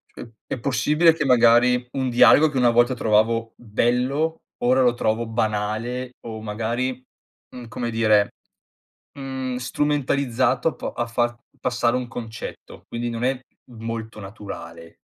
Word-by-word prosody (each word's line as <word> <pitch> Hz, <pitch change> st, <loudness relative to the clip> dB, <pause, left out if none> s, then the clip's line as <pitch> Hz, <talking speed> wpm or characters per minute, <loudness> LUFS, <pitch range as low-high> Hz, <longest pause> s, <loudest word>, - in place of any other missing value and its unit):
Uhm, 115 Hz, -, -10 dB, 0.2 s
è 130 Hz, -, -4 dB
possibile 150 Hz, +7 st, +3 dB
che, 150 Hz, -, -2 dB
magari, 125 Hz, 0 st, +4 dB
un 130 Hz, -2 st, -1 dB
dialogo 145 Hz, +5 st, +6 dB
che 135 Hz, -, -4 dB
una 120 Hz, -2 st, +4 dB
volta 120 Hz, +2 st, +3 dB
trovavo 115 Hz, 0 st, +1 dB
bello, 125 Hz, +8 st, 0 dB, 0.2 s
ora 130 Hz, +2 st, +4 dB
lo 125 Hz, -1 st, +4 dB
trovo 115 Hz, -1 st, -1 dB
banale 115 Hz, +3 st, -2 dB
o 110 Hz, -1 st, -6 dB
magari, 115 Hz, +4 st, -2 dB, 0.5 s
mhmm, 120 Hz, -2 st, -9 dB
come 120 Hz, +1 st, -4 dB
dire, 110 Hz, -3 st, +3 dB, 0.9 s
mhmm, 130 Hz, -2 st, -4 dB
strumentalizzato 140 Hz, +1 st, 0 dB
po -, -, -5 dB
a 120 Hz, -, -2 dB
far 120 Hz, 0 st, -1 dB, 0.2 s
passare 120 Hz, -1 st, 0 dB
un 125 Hz, -1 st, -2 dB
concetto. 115 Hz, -1 st, -8 dB
Quindi, 120 Hz, 0 st, -3 dB
non 115 Hz, +1 st, -4 dB
è 130 Hz, 0 st, +1 dB, 0.3 s
molto 115 Hz, -1 st, -6 dB
naturale 100 Hz, -4 st, -10 dB
120 Hz, 135 wpm, -23 LUFS, 115-130 Hz, 0.9 s, dialogo